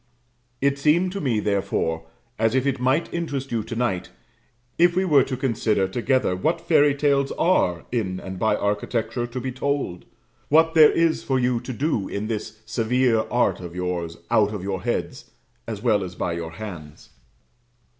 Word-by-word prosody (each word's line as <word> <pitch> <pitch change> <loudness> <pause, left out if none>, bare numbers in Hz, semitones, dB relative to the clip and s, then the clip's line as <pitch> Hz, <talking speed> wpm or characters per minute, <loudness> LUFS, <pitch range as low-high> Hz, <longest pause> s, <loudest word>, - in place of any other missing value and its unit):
It 140 0 +1
seemed 170 +6 +3
to 200 - -4
me, 120 -6 +1
therefore, 90 -5 -1 0.3
as 115 +2 +2
if 130 0 +2
it 135 -2 0
might 130 +6 +1
interest 145 -6 -3
you 115 -2 0
to 115 +2 -6
night, 95 -7 -1 0.7
if 175 0 +5
we 190 +1 +2
were 150 -6 +5
to 130 - -4
consider 110 -6 +1
together 120 0 0
what 160 - 0
fairy 145 -3 +4
tales 140 -1 +1
are, 90 - +1
in 95 -6 -1
and 95 -1 -7
by 110 - +2
architecture, 115 +3 -1
to 125 +2 -5
be 130 +1 -3
told 135 -8 -2 0.4
what 160 +2 +4
there 155 -2 +8
is 165 -1 +2
for 130 -1 0
you 125 -1 +1
to 125 +2 -7
do 120 -6 -1
in 100 +1 -4
this 110 0 -5
severe 115 +1 +1
art 120 0 +1
of 90 -2 -8
yours 90 -2 -3
"out 105 0 +3
of 95 - -6
your 95 -1 -3
heads," 90 -8 -3 0.4
as 110 -2 -5
well 105 -5 +2
as 90 -1 -7
by 85 - -2
your 85 -1 -5
hands. 85 -8 -9
120 Hz, 175 wpm, -23 LUFS, 100-140 Hz, 0.7 s, there